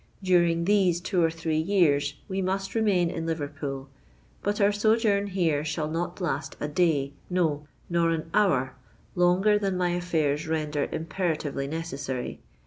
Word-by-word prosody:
During 170 -2 +3
these 190 -4 +3
two 180 0 0
or 165 - +4
three 160 -1 -2
years 155 -6 +2
we 195 -1 -2
must 195 +1 -2
remain 195 -6 +2
in 165 -1 -4
Liverpool: 145 -3 -4 0.5
but 205 +1 -1
our 200 0 +4
sojourn 210 -1 +2
here 170 -7 +1
shall 155 0 -2
not 170 +3 -3
last 155 -6 -2
a 150 - -2
day—no, 150 0 0 0.2
nor 170 -1 +2
an 165 -1 -1
hour 140 -11 +2 0.4
longer 185 +4 +3
than 195 -2 -1
my 180 -1 +1
affairs 160 -4 0
render 150 -2 -1
imperatively 160 -5 -2
necessary. 140 -5 -4
170 Hz, 140 wpm, -27 LUFS, 150-185 Hz, 0.5 s, or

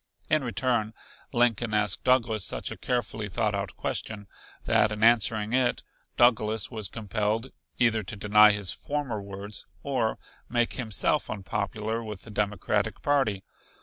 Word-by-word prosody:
In 155 -2 +3
return 120 -2 0 0.4
Lincoln 120 -2 +2
asked 105 -3 +1
Douglas 115 -5 +2
such - - -3
a - - -5
carefully 110 -3 -2
thought 105 +1 0
out 100 -1 -3
question 105 -2 -4 0.4
that 110 - +3
in 105 0 -3
answering 110 -1 +4
it 125 -1 +2 0.3
Douglas 110 -3 +3
was 110 -4 -2
compelled 110 +2 -2 0.3
either 115 -3 +3
to 100 +1 -7
deny 105 +1 +6
his 100 -3 -1
former 140 -8 -3
words 100 +1 -7 0.2
or 125 -6 0 0.3
make 120 -1 +1
himself 110 -8 0
unpopular 110 +2 -3
with 105 -3 -7
the 110 - -10
Democratic 105 -2 -1
party. 135 -10 +1
110 Hz, 140 wpm, -27 LUFS, 105-120 Hz, 0.4 s, deny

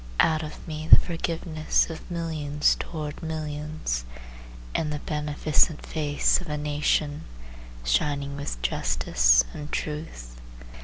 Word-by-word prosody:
Out 160 -1 +4
of 155 +2 -8
me 155 0 -5
the - - +10
forgiveness 165 -2 0
of 160 - -9
millions 155 -4 +1
toward 150 -3 -5
millions, 150 - -3 0.7
And 150 - 0
the 150 - -2
beneficent 150 +1 +1
face 150 +2 +1
of 175 - -9
a 150 - -1
nation 150 0 0 0.6
Shining 140 - 0
with 140 - -4
justice - - +3
and 150 0 -7
truth. 150 - -5
150 Hz, 115 wpm, -26 LUFS, 145-155 Hz, 0.7 s, the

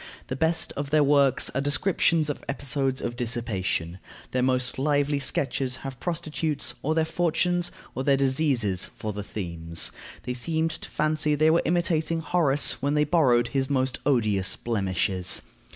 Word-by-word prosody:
The 130 - -2
best 160 +4 0
of 140 0 -4
their 150 0 +4
works 140 -2 +3
are 140 - -1
descriptions 155 +1 +1
of - - -9
episodes 135 -1 -1
of 120 - -3
dissipation; 95 -8 -2 0.3
their 125 - 0
most 125 0 0
lively 145 0 +1
sketches 135 -2 -1
have 135 -2 -6
prostitutes, 155 -2 -2
or 155 +3 0
their 160 -1 +2
fortunes, 175 +1 0 0.2
or 130 - -3
their 140 0 +3
diseases, 130 - +1
for 105 -1 -6
the 105 - -4
themes. 85 -5 -2 0.3
They 125 +2 -3
seemed 160 +6 -1
to - - -7
fancy 155 0 +1
they 155 +2 +4
were 165 - +3
imitating 165 -1 +1
Horace 155 -4 +2
when 140 +2 0
they 150 - +4
borrowed 130 -7 +3
his 135 -1 -1
most 130 -2 0
odious 105 -8 +2
blemishes. 95 -4 -1
140 Hz, 155 wpm, -26 LUFS, 120-155 Hz, 0.3 s, their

